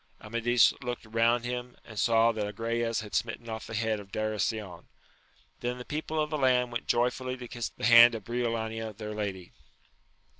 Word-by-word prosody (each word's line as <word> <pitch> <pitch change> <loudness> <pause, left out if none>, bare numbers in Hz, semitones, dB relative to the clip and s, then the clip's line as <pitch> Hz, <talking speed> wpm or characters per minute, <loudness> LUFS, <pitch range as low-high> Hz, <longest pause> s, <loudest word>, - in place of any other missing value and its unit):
Amadis 115 +2 +3
looked 125 -2 -5
round 115 +2 +2
him, 125 0 -5
and 105 -3 -7
saw 115 0 +4
that 110 -2 -3
Agrayes 115 +2 -1
had 105 - -11
smitten 115 +1 -2
off 110 -1 -6
the 110 - -6
head 110 -1 0
of 100 -1 -12
Darasion. 110 -3 -2 0.7
Then 125 +1 -3
the 125 - -8
people 155 +1 -3
of 150 0 -1
the 155 - -1
land 125 -2 +3
went 120 - -4
joyfully 125 +2 0
to 125 -1 -8
kiss 120 0 -4
the - - -5
hand 120 0 +8
of 110 - -6
Briolania 115 -2 -3
their* 105 -1 -5
lady. 100 -4 -4
115 Hz, 180 wpm, -29 LUFS, 110-120 Hz, 0.7 s, hand